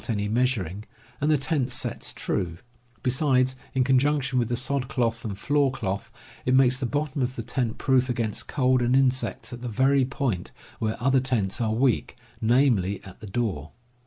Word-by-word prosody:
^j - - -10
any 105 -2 0
measuring, 105 -5 0 0.4
and 150 - +2
the 155 - +4
tent 140 -2 0
Floor 125 - -1
cloth - - -11
sets - - -3
true; 85 -2 -2 0.5
besides, 130 -1 +2 0.2
in 130 - +3
con 130 0 +4
junction 140 -2 +1
with 120 -1 0
the 120 - 0
sod 130 +1 -1
cloth 115 -3 -1
and 100 -3 -4
floor 145 +5 +2
cloth, 100 -7 -3 0.3
it 130 - +2
makes 130 -1 +5
the 130 - -1
bottom 145 +1 -2
of 125 +1 -1
the 115 - -4
tent 120 -1 -2
proof 130 -1 +2
against 115 -4 -2
cold 130 -3 +2
and 120 +1 +2
insects 130 -1 +1
at 120 - -8
the 125 - -4
very 135 +4 +3
point 125 - -2 0.3
where 110 -2 -1
other 135 +2 +3
tents 120 -6 -1
are 110 -1 +1
weak, 125 0 +1 0.3
namely, 110 -5 +3
at 95 -1 -12
the 110 - -9
door. 95 - -3
125 Hz, 195 wpm, -26 LUFS, 110-135 Hz, 0.5 s, makes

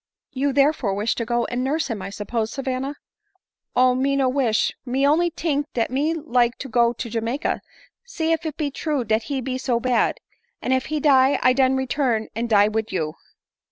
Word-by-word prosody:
" - - -69
You 275 +2 0
therefore 275 -7 +2
wish 210 +3 0
to 230 - -3
go 240 0 0
and 245 +1 -2
nurse 300 +4 0
him, 225 -6 -4
I 190 - -5
suppose, 220 +2 -3
Savanna 270 +1 -3 0.3
?" 400 -2 -48
" - - -55
Oh! 255 0 +5
me 270 +2 +1
no 270 -1 +2
wish; 255 -5 +1
me 265 +2 0
only 325 +5 +3
tink 300 -3 -1
dat 230 -1 0
me 295 +5 0
like 250 -6 +1
to 275 - -6
go 235 -1 +3
to 240 0 -6
Jamaica, 230 +6 -2 0.4
see 330 -10 -2
if 325 - +1 0.2
be 295 -3 -1
true 295 -2 -2
dat 220 0 0
he 275 -2 -1
be 255 +1 -3
so 245 -2 0
bad; 245 +1 +1 0.4
and 260 - 0
if 260 0 0
he 310 -1 -1
die 270 -2 +4
I 255 - +5
den 260 0 +3
return, 260 -4 0
and 230 +1 -2
die 205 -2 +5
wid 220 +1 -2
you." 155 -4 -2
255 Hz, 210 wpm, -23 LUFS, 235-285 Hz, 0.4 s, Oh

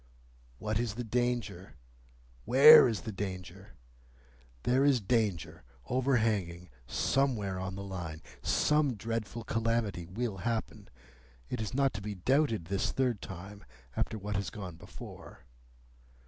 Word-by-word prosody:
"What 110 +5 -1
is 115 -3 -2
the 120 - -3
danger? 120 -7 -2 0.7
Where 140 +3 +9
is 115 -4 -2
the 110 - -5
danger? 95 -1 -7 0.9
There 130 +2 +3
is 140 -3 +4
danger 105 -6 -1 0.2
overhanging 110 - 0 0.2
somewhere 105 - 0
on 95 0 -4
the 100 - -6
Line. 85 -5 -6 0.2
Some 150 -4 +2
dreadful 115 +1 -4
calamity 115 -6 -1
will 105 +2 -3
happen. 110 0 -3 0.6
It - - -2
is 110 +3 -4
not 135 -1 +2
to 105 - -5
be 105 0 -5
doubted 120 - +1
this 95 +2 -1
third 125 -5 0
time, 95 +3 -9 0.3
after 110 - -1
what 105 -1 -3
has 100 -2 -2
gone 95 -6 -7
before. - - -12
105 Hz, 130 wpm, -31 LUFS, 95-120 Hz, 0.9 s, Where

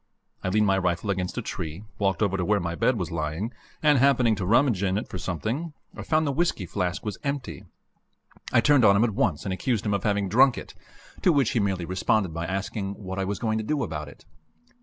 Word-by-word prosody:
I 95 - 0
leaned 105 +2 +3
my 95 -1 +3
rifle 90 +2 0
against 90 -2 -3
a - - -2
tree, 80 +5 -5 0.2
walked 100 +1 +1
over 100 -2 +1
to 95 - -1
where 105 +3 +2
my 85 -2 -3
bed 120 +8 +1
was 90 -2 -3
lying, 80 +8 -3 0.3
and, 150 -3 +5
happening 125 -4 +4
to 95 -2 -3
rummage 115 -2 +3
in 95 -1 +1
it 105 - -3
for 90 - -6
something, 110 - -3 0.2
I - - -7
found 155 0 +1
the 140 - 0
whisky 155 - 0
flask 90 +1 -3
was 105 -3 -4
empty. 135 - -4 0.9
I 120 - +5
turned 145 -2 +4
on 100 -2 +6
him 105 - +4
at 120 - +2
once 80 -5 0
and 95 - -1
accused 115 +2 -1
him 105 - +1
of 100 - -1
having 100 -2 +1
drunk 125 +5 +5
it, - - -8 0.5
to 180 - +4
which 140 -7 +2
he 120 - +1
merely 95 -4 -1
responded 95 0 0
by 85 +1 -3
asking 100 +2 -3
what 95 -1 -6
I 95 - 0
was 100 0 -2
going 110 +1 -1
to - - -3
do 145 +5 -1
about 75 -2 -4
it. - - -17
100 Hz, 235 wpm, -26 LUFS, 90-120 Hz, 0.9 s, on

